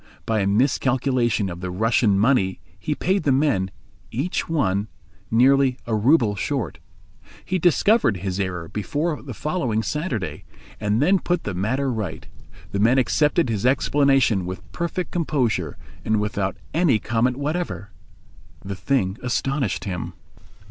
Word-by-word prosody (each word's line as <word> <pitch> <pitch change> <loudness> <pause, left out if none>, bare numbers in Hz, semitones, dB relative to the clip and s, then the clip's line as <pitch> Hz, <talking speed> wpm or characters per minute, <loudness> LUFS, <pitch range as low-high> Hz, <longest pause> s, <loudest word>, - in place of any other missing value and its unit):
By 110 -1 +1
a 100 - +1
miscalculation 125 0 +1
of 85 -1 -6
the 90 - -3
Russian 110 +2 +2
money 100 -5 +2 0.2
he 150 - -2
paid 190 +6 +1
the 145 - +1
men, 130 -9 +2 0.4
each 145 +10 -2
one, 100 -10 +1 0.4
nearly 130 +2 +4
a 115 - -3
rouble 110 -1 +3
short. 110 - -3 0.7
He 185 - -1
discovered 175 - +3
his 95 +1 -3
error 90 -4 -3
before 145 - -2
the 130 -5 -8
following 130 - -1
Saturday, 150 - -3 0.4
and 105 +4 +1
then 190 +4 +4
put 175 -1 -1
the 100 - -3
matter 125 +9 0
right. 105 -7 -4 0.5
The 100 - -2
men 115 +5 +4
accepted 150 +6 +2
his 110 -4 -2
explanation 135 -6 +3
with 95 +1 -8
perfect 170 +1 -3
composure 125 - -1 0.3
and 110 -1 +1
without 100 -2 -2 0.2
any 165 -8 +3
comment 120 +3 0
whatever. 145 - -3 0.7
The 100 0 -4
thing 95 +1 0
astonished 130 -2 -1
him. 90 -5 -4
120 Hz, 140 wpm, -23 LUFS, 100-145 Hz, 0.7 s, nearly